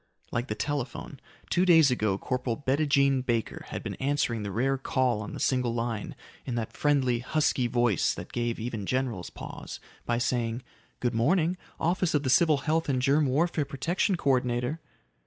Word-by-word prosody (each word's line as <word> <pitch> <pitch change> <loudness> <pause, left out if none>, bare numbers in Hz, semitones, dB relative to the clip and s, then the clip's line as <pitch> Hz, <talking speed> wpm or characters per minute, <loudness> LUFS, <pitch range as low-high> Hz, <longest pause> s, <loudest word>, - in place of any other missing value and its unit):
Like 120 +1 -1
the 105 - -3
telephone. 140 +1 -4 0.3
Two 180 - +3
days 165 -6 +6
ago 105 -5 +1
Corporal 125 0 -2
Bettijean 140 -1 +2
Baker 115 -3 -2
had - - -5
been - - -4
answering 135 -5 0
the 100 -1 -4
rare 130 +7 +1
call 130 -4 0
on 100 - -6
the - - -6
single 125 -3 +1
line 115 -2 -3 0.3
in 125 - -4
that 115 -2 -3
friendly, 135 -5 +2
husky 135 -1 +1
voice 120 -6 +2
that - - -8
gave 120 -1 -1
even 110 -4 -4
generals 125 -8 -1
pause - - -8 0.3
by 120 - +1
saying, 120 0 -1 0.4
"Good 125 0 0
morning. 165 +9 +2 0.2
Office 175 0 +1
of 145 - +2
the 130 - +1
Civil 155 +1 +5
Health 160 0 +1
and 130 -2 +1
Germ 140 +3 +3
Warfare 155 +4 +1
Protection 165 +8 0
Co 140 - +2
ordinator." 125 +4 0
130 Hz, 175 wpm, -28 LUFS, 120-145 Hz, 0.4 s, days